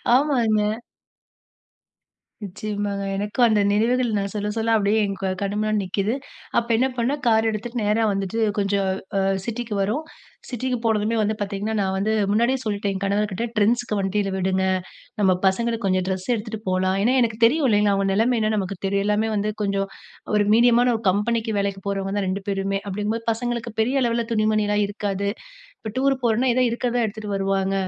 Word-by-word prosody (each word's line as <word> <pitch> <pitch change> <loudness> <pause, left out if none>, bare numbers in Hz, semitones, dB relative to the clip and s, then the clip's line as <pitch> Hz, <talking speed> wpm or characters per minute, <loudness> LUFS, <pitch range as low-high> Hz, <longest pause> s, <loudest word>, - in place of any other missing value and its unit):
ஆமாங்க. 240 -7 +2 1.8
நிச்சியமாங்க. 205 0 -3
எனக்கும் 210 +5 +2
அந்த 215 -2 +3
நினைவுகள் 235 +2 +2
நான் 200 0 -2
சொல்ல 210 0 -2
சொல்ல 225 0 +1
அப்டியே 210 +1 +2
என் 195 -1 -4 0.3
கண் 200 0 -1
முன்னாடி 215 0 +1
நிக்குது. 195 +4 -1 0.4
அப்ப 235 - 0
என்ன 255 +4 +2
பண்ணே 240 +4 +1
கார் 225 -1 +4
எடுத்துட்டு 230 +3 -4
நேரா 210 +2 +2
வந்துட்டு 195 +3 -2 0.2
கொஞ்சம் 200 -1 +1 0.3
அ - - +2 0.2
சிட்டிக்கு 235 -1 -4
வரோம் 220 +11 -1 0.4
சிட்டிக்கு 250 0 -2
போனதுமே 220 0 +1
வந்து 215 +1 0
பார்த்தீங்கன்னா 205 +1 -3
நான் 190 -1 0
வந்து 200 +3 0 0.2
முன்னாடியே 235 +5 +2
சொல்ட்டேன். 205 -2 -1
என் 190 - -5
கணவர்கிட்ட 200 +1 0
Trendsக்கு 230 +1 +2
வண்டியில 195 +1 0
விடுங்க 190 0 0 0.6
நம்ம 195 -2 +4
பசங்களுக்கு 230 +3 +1
கொஞ்சம் 185 -1 +1
ட்ரெஸ் 190 -1 -3
எடுத்துட்டு 220 -1 -4
போலாம். 185 0 +1
ஏனா, 240 +5 +3
எனக்கு 225 -2 0
தெரியும் 285 +6 +4
இல்லைங்களா 210 -2 +3
அவங்க 195 0 0
நெலமை 230 +5 +2
என்னனு 215 0 +1
நமக்கு 195 -1 -2
தெரியும் 200 0 +1
எல்லாமே 210 +1 +1
வந்து 210 +1 0
கொஞ்சம் 195 -1 0 0.5
ஒரு 210 0 +4
மீடியமான 240 +2 +5
ஒரு 220 - -4
கம்பெனிக்கு 220 +4 0
வேலைக்கு 200 -1 -2
போறவங்க 195 -1 -2
தான் 200 - 0
2 190 +1 -2
பேருமே 195 0 -1
அப்டிங்கும்போது 210 +3 -2
பசங்களுக்கு 235 0 -3
பெரிய 255 +5 +2
அளவுல 235 -1 0
துணிமணில 215 -1 +1
இருக்காது. 200 -1 -2 0.5
இப்ப 220 - -7
டூர் 270 +1 +3
போறோம்னா 235 +3 +2
ஏதா 255 0 +3
இருக்கறதா 240 0 0
எடுத்துட்டு 210 -1 -5
வருவாங்க 195 0 0
210 Hz, 165 wpm, -23 LUFS, 200-230 Hz, 1.8 s, மீடியமான